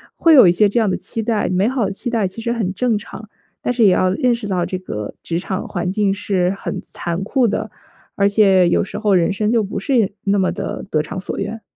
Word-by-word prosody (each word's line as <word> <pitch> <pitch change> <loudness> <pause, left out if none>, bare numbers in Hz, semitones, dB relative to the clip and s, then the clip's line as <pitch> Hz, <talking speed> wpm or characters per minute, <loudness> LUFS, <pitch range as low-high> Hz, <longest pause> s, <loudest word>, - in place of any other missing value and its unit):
会 330 -2 +5
有 255 - +8
一 - - +6
些 205 +4 +3
这 235 - +1
样 220 - +2
的 - - 0
期 225 - -4
待。 220 -4 0
美 185 +3 +1
好 255 -1 0
的 195 - -2
期 200 +6 -6
待 225 -5 0
其 190 +5 -8
实 235 - 0
很 215 -6 -2
正 245 +1 +1
常， 215 +1 -10 0.3
但 245 - -1
是 240 -2 +2
也 195 - +6
要 185 0 +2
认 245 +3 +1
识 230 -3 -6
到 185 -3 0
这 185 - -3
个 105 - -6
职 170 0 -2
场 190 +1 -4
环 180 -1 -3
境 200 -1 +1
是 195 -3 0
很 - - -5
残 170 +2 -5
酷 245 +4 +1
的。 - - -3 0.4
而 200 0 +3
且 195 -4 +4
有 - - +2
时 195 - -6
候 210 -3 +2
人 180 +2 +2
生 210 +2 0
就 230 -2 +2
不 195 - -4
是 220 -3 +1
那 200 0 +2
么 185 - +1
地 - - -5
得 155 - +2
偿 155 +4 -6
所 185 - -5
愿。 215 +3 -4
200 Hz, 275 characters per minute, -19 LUFS, 185-225 Hz, 0.4 s, 有